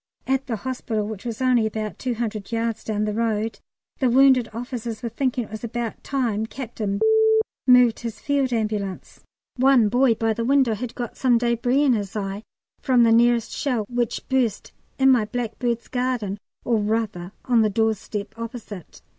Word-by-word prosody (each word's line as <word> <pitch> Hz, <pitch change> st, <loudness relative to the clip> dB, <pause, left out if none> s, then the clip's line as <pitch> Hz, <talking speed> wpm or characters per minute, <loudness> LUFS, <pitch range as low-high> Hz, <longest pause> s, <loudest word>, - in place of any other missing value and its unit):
At 270 Hz, +1 st, 0 dB
the 235 Hz, -, -1 dB
hospital, 225 Hz, -3 st, -3 dB
which 215 Hz, -1 st, -7 dB
was 235 Hz, +1 st, -3 dB
only 245 Hz, -4 st, +3 dB
about 215 Hz, -4 st, -5 dB
200 225 Hz, -5 st, -3 dB
yards 230 Hz, -1 st, -2 dB
down 215 Hz, -1 st, -1 dB
the 210 Hz, -, -2 dB
road, 220 Hz, -1 st, -1 dB, 0.4 s
the 260 Hz, -, +3 dB
wounded 260 Hz, -1 st, +5 dB
officers 235 Hz, -1 st, -5 dB
were 235 Hz, -, -2 dB
thinking 250 Hz, +1 st, -1 dB
it 215 Hz, -, -13 dB
was 220 Hz, +1 st, -7 dB
about 235 Hz, -1 st, -4 dB
time 230 Hz, -6 st, -1 dB
Capt. 240 Hz, -2 st, -8 dB, 0.9 s
moved 250 Hz, -2 st, +6 dB
his 225 Hz, -2 st, -6 dB
Field 280 Hz, -1 st, 0 dB
Ambulance. 210 Hz, -4 st, -3 dB, 0.4 s
One 255 Hz, -4 st, +5 dB
boy 245 Hz, +1 st, +3 dB
by 225 Hz, 0 st, 0 dB
the 230 Hz, -, -3 dB
window 265 Hz, -2 st, +3 dB
had 240 Hz, +2 st, -5 dB
got 240 Hz, -2 st, -5 dB
some 250 Hz, -3 st, +3 dB
débris 240 Hz, +4 st, +1 dB
in 265 Hz, -, +4 dB
his 205 Hz, -3 st, -3 dB
eye 200 Hz, -1 st, -3 dB, 0.4 s
from 250 Hz, -3 st, +3 dB
the 230 Hz, -, +4 dB
nearest 235 Hz, 0 st, +3 dB
shell, 245 Hz, -7 st, -1 dB
which 240 Hz, -2 st, -2 dB
burst 255 Hz, -5 st, 0 dB, 0.3 s
in 265 Hz, 0 st, +5 dB
my 240 Hz, -5 st, +3 dB
blackbird's 235 Hz, +1 st, -3 dB
garden, 245 Hz, -6 st, -2 dB, 0.3 s
or 235 Hz, -2 st, +2 dB
rather 210 Hz, -4 st, -2 dB
on 240 Hz, -2 st, +4 dB
the 215 Hz, -, +3 dB
doorstep 210 Hz, -1 st, -2 dB
opposite. 230 Hz, -5 st, -8 dB
230 Hz, 170 wpm, -23 LUFS, 215-250 Hz, 0.9 s, moved